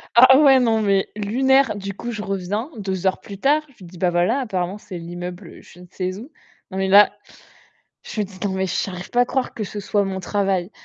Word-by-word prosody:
A 240 +2 +9
ah - - +6
ouais 275 -3 +6
non, 225 -3 +2
mais 195 -2 +1
lunaire, 265 +4 +2
du 200 0 -6
coup, 240 +5 -6
je 210 -2 -5
reviens 195 - -3
2 190 -2 -3
heures 190 - +1
plus 200 -2 -10
tard, 295 +6 +3
je - - -31
lui 185 - -13
dis: 175 +1 -13
«Bah 180 0 +2
voilà, 180 +10 +1
apparemment, 190 -5 -3
c'est 185 -3 -9
l'immeuble, 175 +1 -7
heu, - - -14
je 180 - -17
ne 180 - -13
sais 185 0 -4
où». 245 +8 -11 0.4
Non, 190 - -5
mais 190 0 0
là, 205 +1 +7 0.9
je 215 - -5
me - - +1
dis: 190 -1 -14
«Non 200 - 0
mais 190 0 -1
j'arrive 180 0 -4
pas 245 - +2
à - - +5
croire 260 +1 -2
que 215 - -4
ce 205 +1 -6
soit 205 0 0
mon 190 -1 -4
travail». 195 -1 -1
200 Hz, 245 wpm, -21 LUFS, 185-225 Hz, 0.9 s, A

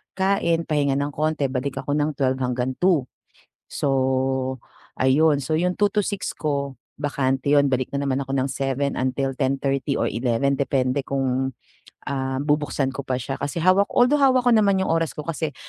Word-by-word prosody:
kain 190 -4 +1
pahinga 145 -3 +1
ng 140 +1 -1
konti 150 -2 -1
balik 135 +1 -3
ako 145 - -3
ng 150 +1 0
12:00 130 -2 0
hanggang 125 0 -1
2:00. 180 -7 +3 0.7
So, - - -1 1.1
ayun. 145 +3 +4
So, 155 +4 -1
yung 180 +2 +1
2:00 205 - +5
to 210 - +3
6:00, 200 -2 -4
ko 140 -3 -2 0.2
bakante 140 -1 -1
'yon, 145 -1 +5
balik 130 -1 -1
na 140 - -2
naman 135 +1 0
ako 135 - -9
ng 130 - +1
7:00 135 +1 -2
until 130 +1 -1
10:30 135 +1 -1
or - - +1
11:00 125 +4 0
depende 135 0 0
kung, 130 -1 -1 0.6
ah, 135 -1 -2
bubuksan 145 -2 0
ko 135 +1 -7
pa 130 - -1
siya, 135 +3 -4
kasi 145 +4 -3
hawak 185 +2 +4
although 260 +4 +4
hawak 260 -2 +4
ko 245 - +3
naman 200 -4 +4
yung - - -1
oras 165 -1 0
ko 150 - -5
kasi, 155 -2 -3
140 Hz, 180 wpm, -23 LUFS, 130-160 Hz, 1.1 s, 2:00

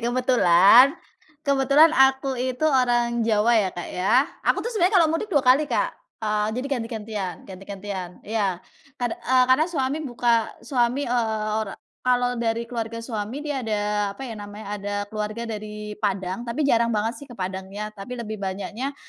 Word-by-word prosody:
Kebetulan, 245 - +5 0.5
kebetulan 280 +3 +5
aku 265 0 +3
itu 255 +3 -2
orang 240 -4 +2
Jawa, 220 +1 +3
ya, 195 - +1
Kak, 175 - -6
ya. 190 +5 0 0.3
Aku - - +3
tuh 475 - -2
sebenarnya 395 -2 +2
kalau - - +4
mudik 415 +6 -2
2 285 -7 +2
kali, 275 +4 +4
Kak. - - 0 0.2
Eee, 210 -1 -1
jadi 255 +2 -2
ganti-gantian 215 -5 -5
ganti-gantian, 190 -1 -7
iya. 200 -4 -1 0.4
Kad 245 -3 -2
eee, 255 0 +3
karena 310 +6 +3
suami 285 -2 -1
buka 240 -5 +1 0.2
suami, 250 +2 +1
eee, 220 -3 -1
ora 200 -3 -5 0.3
kalau 245 -1 +2
dari 230 0 0
keluarga 230 -1 -4
suami, 230 +4 -4
dia 290 -3 -2
ada 215 -3 -1 0.3
apa - - -8
ya 240 - -6
namanya, 205 +1 -9
ada 205 0 -4 0.2
keluarga 215 +2 -3
dari 210 -1 -6
Padang, 195 +2 -2
tapi 295 +6 -1
jarang 235 -4 +3
banget 225 +2 -1
sih 285 - -10
ke 245 - -10
Padangnya, 190 +3 -5
tapi 210 +4 -8
lebih 220 -3 -6
banyaknya, 205 +8 -4
230 Hz, 165 wpm, -24 LUFS, 210-260 Hz, 0.5 s, Kebetulan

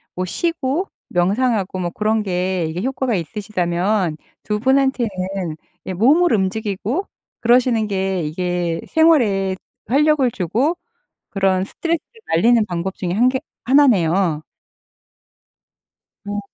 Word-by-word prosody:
뭐 185 - -2
쉬고 320 - -1 0.2
명상하고 200 +2 +1
뭐 175 -1 -1
그런 215 +3 0
게 185 -2 -1
이게 165 +3 -4
효과가 260 -1 -1
있으시다면 180 -1 -1 0.3
2 210 - -1
분한테는 265 0 +2 0.8
예 185 - -2
몸을 290 - +4
움직이고 215 - -1 0.3
그러시는 235 -2 +3
게 190 -3 -1
이게 175 +1 -2
생활에 225 - +3 0.3
활력을 285 -1 +3
주고 225 - 0 0.6
그런 190 -1 +1
스트레스를 335 - -2 0.3
날리는 230 +7 +4
방법 175 +2 -3
중에 175 -2 -3
1 235 +7 +3
개 260 0 -2 0.2
1 280 +4 +5
네요. 170 -6 +2 1.8
어. 205 0 -3
205 Hz, 235 characters per minute, -20 LUFS, 185-255 Hz, 1.8 s, 1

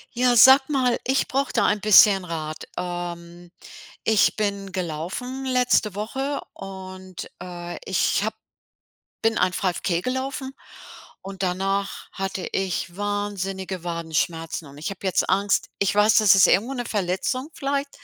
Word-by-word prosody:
Ja, 245 0 +3
sage 265 +3 +8
mal, 255 -5 +1
ich 265 +2 +1
brauche 275 +1 -1
da - - +2
ein 210 0 +1
bisschen 200 -2 +7
Rat. 155 -3 -5
Ähm, 175 -1 -6 0.5
ich 220 -2 +3
bin 200 -2 -2
gelaufen 185 - -4
letzte 250 -6 +2
Woche 265 +7 -3
und, 185 -1 -9
äh, 175 -1 -7
ich - - +1
habe - - -2 0.9
bin 225 0 +1
ein 180 0 +2
5K 180 -2 -1
gelaufen. 265 +3 -3 0.7
Und 195 0 -7
danach 195 +2 -2
hatte 195 -1 -4
ich 180 -2 -2
wahnsinnige 195 -3 -3
Wadenschmerzen 165 -1 -2
und 140 +1 -14
ich 155 - -3
habe 195 - -8
jetzt 190 -2 +1
Angst 200 0 +1
ich 195 -3 +1
weiß, 210 +1 +4
das 215 -3 +7
ist 190 - +7
irgendwo 235 +7 +2
'ne 245 -2 -4
Verletzung 210 - -2
vielleicht. 280 +1 -2
195 Hz, 140 wpm, -24 LUFS, 180-240 Hz, 0.9 s, sage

